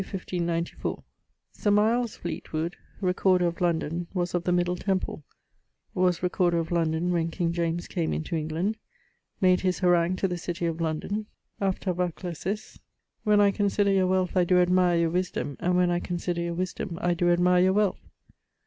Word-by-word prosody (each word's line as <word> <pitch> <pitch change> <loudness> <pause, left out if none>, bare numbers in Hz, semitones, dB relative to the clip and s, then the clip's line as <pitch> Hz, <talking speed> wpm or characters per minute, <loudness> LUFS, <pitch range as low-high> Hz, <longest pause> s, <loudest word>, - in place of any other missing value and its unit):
Sir 210 - -1
Miles 220 +3 +2
Fleetwood, 170 0 -4 0.3
Recorder 185 -1 +2
of 170 0 -2
London, 170 0 0
was 175 -1 -1
of 175 -1 -1
the 180 - +1
Middle 175 0 +1
Temple; 185 -4 -2 0.7
was 180 -1 +1
Recorder 180 -1 +2
of 165 0 -2
London, 165 +1 +1
when 165 -1 0
King 170 0 -1
James 170 0 -1
came 170 -4 -2
into 160 +1 -3
England; 165 +7 -1 0.6
made 185 -1 +4
his 185 -1 +1
harangue 175 -1 +3
to 195 - 0
the 180 -1 -4
City 175 0 -3
of 165 0 -2
London 180 +7 -2 0.3
(ἀντανάκλασις), 185 +1 -3 0.5
'When 210 -1 +4
I 200 -1 +5
consider 200 0 +1
your 190 -1 +3
wealth 185 0 0
I 180 - +4
doe 180 +1 +3
admire 180 -1 +3
your 165 -1 +2
wisdome, 175 -5 -2
and 180 +1 +1
when 180 -1 +3
I 175 - +1
consider 175 -1 -3
your 170 0 -2
wisdome 180 -1 -3
I 175 0 +1
doe 175 0 +1
admire 180 +1 +4
your 190 +1 +4
wealth.' 205 -1 +1
180 Hz, 165 wpm, -27 LUFS, 170-185 Hz, 0.7 s, I